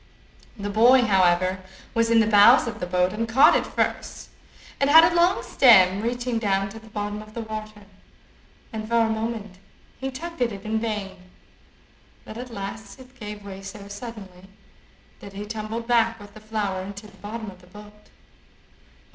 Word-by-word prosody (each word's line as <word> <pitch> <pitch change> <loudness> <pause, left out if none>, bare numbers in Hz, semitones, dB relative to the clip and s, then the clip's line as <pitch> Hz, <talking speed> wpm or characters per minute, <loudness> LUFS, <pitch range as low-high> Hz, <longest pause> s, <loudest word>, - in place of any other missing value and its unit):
The 205 -1 -4
boy, 245 +5 +5
however, 185 -3 +2 0.3
was 230 -1 +1
in 230 -1 +5
the - - +2
bows 210 +4 +6
of 225 -2 -6
the 180 - -4
boat, 180 +1 +1
and 225 +1 -3
caught 270 +7 +6
it - - 0
first. - - -3 0.5
It 275 - +3
had 320 +3 +9
a 335 +1 +3
long 350 +2 +3
stem, 195 -6 +5
reaching 240 0 -2
down 195 -2 0
to 225 +3 -10
the 220 0 -16
bottom 210 0 -4
of 215 0 -15
the 230 - -4
water, 215 -1 -8 0.9
and 215 -1 -5
for 235 - 0
a 225 - +2
moment 220 -4 -4 0.4
he 265 - -3
tugged 335 +4 -8
at 240 -1 +1
it 200 -1 -9
in 220 +1 -1
vain, 210 -4 -4 1.1
but 215 - -10
at 250 +2 -7
last 205 +1 -8
it 260 0 -17
gave 210 -1 -8
way 195 -1 -8
so 195 +1 -10
suddenly, 200 -4 -10 0.7
that 200 - -11
he 205 +1 -6
tumbled 220 +2 -5
back 230 -1 +2
with 205 0 -13
the 215 - -12
flower 210 -3 -3
into 200 +2 -9
the 210 - -16
bottom 220 0 -7
of 185 -1 -17
the 180 - -19
boat. 210 +2 -15
215 Hz, 180 wpm, -24 LUFS, 200-230 Hz, 1.1 s, had